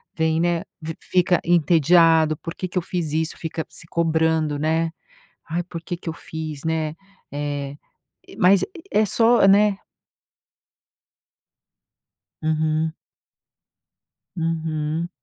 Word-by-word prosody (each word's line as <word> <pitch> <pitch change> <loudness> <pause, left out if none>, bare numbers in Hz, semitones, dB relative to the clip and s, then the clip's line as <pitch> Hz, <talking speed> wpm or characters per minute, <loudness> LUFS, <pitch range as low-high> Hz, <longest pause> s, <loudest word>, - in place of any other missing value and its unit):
vem 160 0 +1
né. 175 +1 +1 0.2
Vi 160 +1 -5
fica 180 -1 +2
entediado. 165 -1 +4
"Por 165 -1 -7
que 185 - -4
que 180 - -5
eu - - +3
fiz 170 -3 -3
isso?". 160 +1 -1
Fica 160 -1 -4
se 160 - -14
cobrando, 160 -3 +1
né. 160 +1 +1 0.6
"Ai, 170 +2 -1
por 170 -2 -8
que 175 +1 -4
que 170 - -6
eu - - -3
fiz?". 155 -3 -7
Né. 160 -1 -1 0.4
Eh, 145 -1 -4 0.5
eh, - - -13
mas 185 +2 +5 0.3
é 210 0 +3
só 230 +1 +4
né. 200 0 +4 2.6
Uhum. 155 0 0 1.4
Uhum. 160 0 -2
160 Hz, 120 wpm, -22 LUFS, 155-175 Hz, 2.6 s, mas